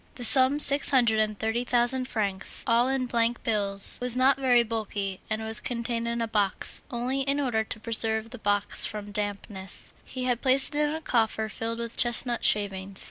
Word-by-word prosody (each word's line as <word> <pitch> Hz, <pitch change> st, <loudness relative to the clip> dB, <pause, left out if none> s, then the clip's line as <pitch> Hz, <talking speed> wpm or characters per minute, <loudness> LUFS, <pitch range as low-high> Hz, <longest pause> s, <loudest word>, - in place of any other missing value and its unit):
The 245 Hz, -, -8 dB
sum, 260 Hz, +4 st, +5 dB
six 285 Hz, -1 st, +8 dB
hundred 235 Hz, -5 st, +2 dB
and 215 Hz, -1 st, -1 dB
thirty 225 Hz, +3 st, -2 dB
thousand 250 Hz, +1 st, 0 dB
francs, 200 Hz, -5 st, 0 dB
all 240 Hz, 0 st, +1 dB
in 265 Hz, -1 st, -1 dB
bank 235 Hz, -1 st, -1 dB
bills, 200 Hz, -3 st, +1 dB
was 250 Hz, 0 st, +1 dB
not 260 Hz, +2 st, +3 dB
very 250 Hz, -3 st, +3 dB
bulky, 210 Hz, -4 st, -5 dB
and 220 Hz, 0 st, -3 dB
was 220 Hz, 0 st, -1 dB
contained 235 Hz, -1 st, -4 dB
in 235 Hz, 0 st, -2 dB
a -, -, -3 dB
box; 210 Hz, -3 st, 0 dB
only, 250 Hz, +3 st, -3 dB
in 275 Hz, +1 st, -1 dB
order 240 Hz, -6 st, -1 dB
to 220 Hz, -, -7 dB
preserve 225 Hz, 0 st, -2 dB
the 250 Hz, -, -10 dB
box 205 Hz, -1 st, 0 dB
from 205 Hz, -1 st, -8 dB
dampness, 205 Hz, -2 st, -5 dB
he 255 Hz, -1 st, -8 dB
had 245 Hz, -2 st, -2 dB
placed 265 Hz, +2 st, +3 dB
it 295 Hz, 0 st, 0 dB
in 305 Hz, -, -4 dB
a 320 Hz, -, -7 dB
coffer 220 Hz, -5 st, -1 dB
filled 230 Hz, +1 st, -5 dB
with 235 Hz, 0 st, -7 dB
chestnut 240 Hz, 0 st, +1 dB
shavings. 195 Hz, -2 st, -2 dB
230 Hz, 190 wpm, -25 LUFS, 215-250 Hz, -, six